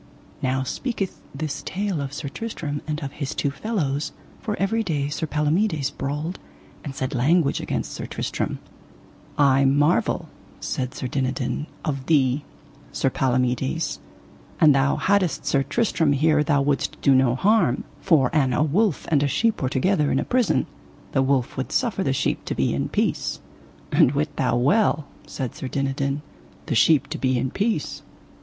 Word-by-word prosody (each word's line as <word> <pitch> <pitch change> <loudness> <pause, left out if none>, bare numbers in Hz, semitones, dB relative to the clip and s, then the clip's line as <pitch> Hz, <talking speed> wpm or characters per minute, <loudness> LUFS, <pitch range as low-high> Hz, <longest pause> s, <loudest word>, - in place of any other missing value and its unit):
Now 130 0 0
speaketh 200 - -3
this 150 0 -3
tale 195 -4 -2
of 135 -1 -4
Sir 145 0 -5
Tristram 150 -5 -4
and 150 -1 -2
of 135 - -4
his 140 -1 -4
two 140 - 0
fellows, 145 -4 -2 0.3
for 210 - -3
every 225 +4 +1
day 150 -8 -1
Sir 160 +2 -3
Palomides 150 0 +1
brawled 150 +5 -4 0.4
and 140 -3 -6
said 130 +2 -3
language 140 +4 +2
against - - -3
Sir - - -6
Tristram. - - -3 0.8
I 140 -1 +5
marvel, 145 +5 +2 0.3
said 130 0 -3
Sir - - -5
Dinadan, 130 +2 -2 0.2
of 135 -3 -3
thee, 140 -3 +3 0.5
Sir 135 - 0
Palomides, 125 - 0 0.6
an 155 - +7
thou 135 0 +3
haddest 195 -6 +1
Sir 140 - +2
Tristram 160 - +1
here 150 +1 +3
thou 145 -2 +2
wouldst 140 0 -1
do 140 - +4
him 130 - +6
no 125 -2 +3
harm; 200 - +2 0.2
for 150 -9 +3
an 135 -4 +3
a 150 - +2
wolf 180 +4 +1
and 145 -3 +4
a 145 - +2
sheep 220 +11 +1
were 130 - +1
together 150 +2 +1
in - - +2
a - - 0
prison 245 -5 +2 0.5
the 135 - +2
wolf 135 -2 +1
would 130 - -3
suffer 230 -7 0
the 135 - +1
sheep 135 - 0
to - - -3
be - - +1
in - - -1
peace. - - -1
145 Hz, 140 wpm, -24 LUFS, 135-165 Hz, 0.8 s, an